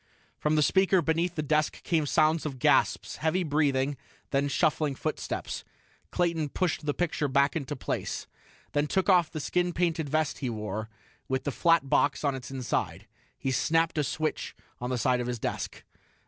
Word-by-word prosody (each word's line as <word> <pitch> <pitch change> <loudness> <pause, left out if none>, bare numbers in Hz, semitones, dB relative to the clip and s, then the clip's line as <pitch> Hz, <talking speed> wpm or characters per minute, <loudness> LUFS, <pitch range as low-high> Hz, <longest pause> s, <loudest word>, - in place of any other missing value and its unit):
"_ - - -46
From 150 +1 +2
the 150 - +4
speaker 190 +4 +4
beneath 165 +2 0
the 155 - -1
desk 150 +1 0
came 160 -4 +1
sounds 155 +2 +3
of 135 -3 -6
gasps, - - +2
heavy 160 +4 +1
breathing, 145 -3 +1 0.3
then 140 +1 +2
shuffling 145 +1 +1
footsteps. - - -3 0.5
Clayton 165 -4 0
pushed 165 -1 -1
the 145 - +2
picture 165 -4 0
back 140 +3 +2
into 145 -2 -3
place, 130 - -3 0.5
then 145 0 +1
took 190 +5 +1
off 180 -4 +5
the 155 - -5
skin 175 +4 0
painted 165 -3 0
vest 155 0 0
he 130 - -2
wore, 110 -1 -4 0.4
with 130 0 -1
the 145 - -1
flat 165 -1 +3
box 140 +2 +2
on 140 -2 +2
its 130 -1 -7
inside. 130 -2 -2 0.3
He 135 - -2
snapped 165 +4 +2
a - - +2
switch 155 +3 -2 0.2
on 125 - -3
the 130 - 0
side 125 +1 +2
of 120 - -3
his 125 -1 -2
desk. - - -4
150 Hz, 180 wpm, -28 LUFS, 135-165 Hz, 0.5 s, off